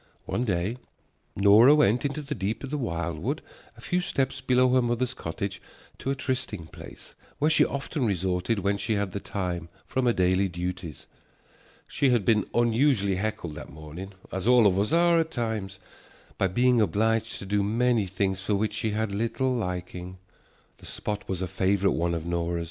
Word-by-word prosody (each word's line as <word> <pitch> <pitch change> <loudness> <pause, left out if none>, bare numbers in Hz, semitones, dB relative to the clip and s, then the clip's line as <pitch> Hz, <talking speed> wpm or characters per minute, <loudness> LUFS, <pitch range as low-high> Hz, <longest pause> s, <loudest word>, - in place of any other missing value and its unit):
One 120 - -1
day 100 +3 -1 0.6
Nora 105 +8 +7
went 125 -4 +3
into 145 +2 -2
the 145 +1 -4
deep 105 +1 -3
of 135 - -6
the 150 - -1
wildwood 85 - -2 0.4
a - - -13
few 180 0 0
steps 135 -5 -1
below 130 0 +3
her 130 - +5
mother's 120 +1 0
cottage 95 -2 -5 0.4
to - - -3
a 135 - +1
trysting 130 - -3
place - - -12 0.2
where 150 +2 +2
she - - +5
often 140 -1 -2
resorted 95 +2 0
when 100 +1 0
she 110 - -1
had 100 -2 -1
the 100 - -4
time 90 -4 -4 0.2
from 130 -1 0
her 120 - +4
daily 95 +1 +2
duties. 90 -2 -5 0.8
She 140 -2 +1
had 120 -6 +2
been 105 0 +2
unusually 115 -4 +2
heckled 95 -5 -3
that 75 -2 -9
morning, 80 +6 -9 0.2
as 95 +3 -3
all 125 -2 +6
of 95 -1 +4
us 105 - 0
are 170 0 +4
at 160 0 0
times, 110 - -3 0.6
by 95 - +1
being 120 +5 +3
obliged 110 +2 +1
to - - -7
do 100 +1 +1
many 115 +1 +1
things 95 0 -1
for 100 +2 -1
the - - +3
which 110 +2 -1
she 110 - -1
had 110 -1 -1
little 115 +5 0
liking. 90 -4 -4 0.6
The - - -13
spot 105 -1 -5
was 95 -1 -2
a - - -2
favorite 95 +2 +1
one 85 +1 0
of 80 -1 -4
Nora's. 85 0 -1
105 Hz, 185 wpm, -27 LUFS, 95-125 Hz, 0.8 s, Nora